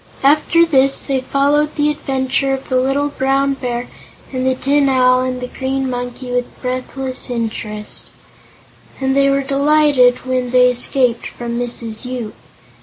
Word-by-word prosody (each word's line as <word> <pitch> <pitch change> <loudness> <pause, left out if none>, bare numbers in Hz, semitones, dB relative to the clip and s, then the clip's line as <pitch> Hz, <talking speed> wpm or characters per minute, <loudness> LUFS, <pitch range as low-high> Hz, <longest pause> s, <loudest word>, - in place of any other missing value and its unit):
After 305 +4 +4
this 275 -4 +3
they 270 -2 -1
followed 285 +3 +1
the 295 0 +2
adventure 270 -1 -1
of 265 - -10
the 255 - +1
little 270 +3 +1
Brown 275 0 +1
Bear 245 -2 -4 0.5
and 255 0 -1
the 260 - +2
Tin 280 +1 +2
Owl 255 -1 +4
and 255 0 -2
the 250 - -5
Green 265 +1 -3
Monkey 245 0 -5
with 245 0 -3
breathless 255 +1 -2
interest, 220 -3 -3 0.9
and 265 0 0
were 275 0 +3
delighted 280 -3 +3
when 255 -1 -1
they 250 0 +5
escaped 250 -1 0
from 235 0 -5
Mrs. 230 -2 -3
Yoop. 250 -4 -5
260 Hz, 145 wpm, -17 LUFS, 250-275 Hz, 0.9 s, they